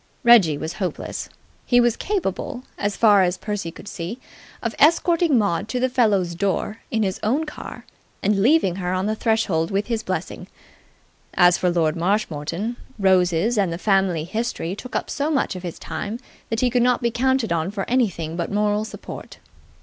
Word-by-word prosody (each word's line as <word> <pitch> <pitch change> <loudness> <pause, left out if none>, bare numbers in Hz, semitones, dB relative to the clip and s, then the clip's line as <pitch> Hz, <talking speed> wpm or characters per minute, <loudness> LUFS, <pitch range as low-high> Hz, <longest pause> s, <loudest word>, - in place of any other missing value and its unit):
Reggie 210 - +6
was 160 +3 -4
hopeless: 180 -5 -4 0.3
he 245 - +3
was 240 -1 +3
capable, 345 - -3
as 205 0 -2
far 205 -3 +6
as 180 0 +1
Percy 205 -4 -4
could 180 - -12
see, 180 +6 -5 0.5
of 235 -1 -1
escorting 335 0 +4
Maud 200 -2 0
to 250 - -1
the 255 +1 +1
fellow's 210 -9 +2
door 200 +4 -1
in 220 -1 0
his 190 -2 -2
own 270 +9 +1
car 300 - -9 0.4
and 195 0 +2
leaving 230 - +3
her 180 -1 -2
on 185 +1 0
the 215 +1 0
threshold 215 -8 +1
with 200 +1 0
his 230 -2 -2
blessing. - - -4 0.9
As 175 -1 +5
for 180 - +2
Lord 165 -2 +1
Marshmoreton, 180 +3 -1 0.2
roses 190 +2 +2
and 190 -4 +1
the 165 - -3
family 190 -4 +1
history 195 -1 -3
took 255 +4 -9
up - - -1
so 285 +2 -2
much 280 -10 0
of 185 - -6
his 175 -2 -6
time 200 +7 -5 0.3
that 225 0 -1
he 250 -1 +2
could 245 0 +2
not 250 0 +2
be 235 - +2
counted 260 -3 +1
on 165 +1 -1
for 195 -1 -4
anything 190 -10 0
but 170 +2 -3
moral 210 +1 +1
support. 220 - -9
205 Hz, 180 wpm, -22 LUFS, 180-240 Hz, 0.9 s, Reggie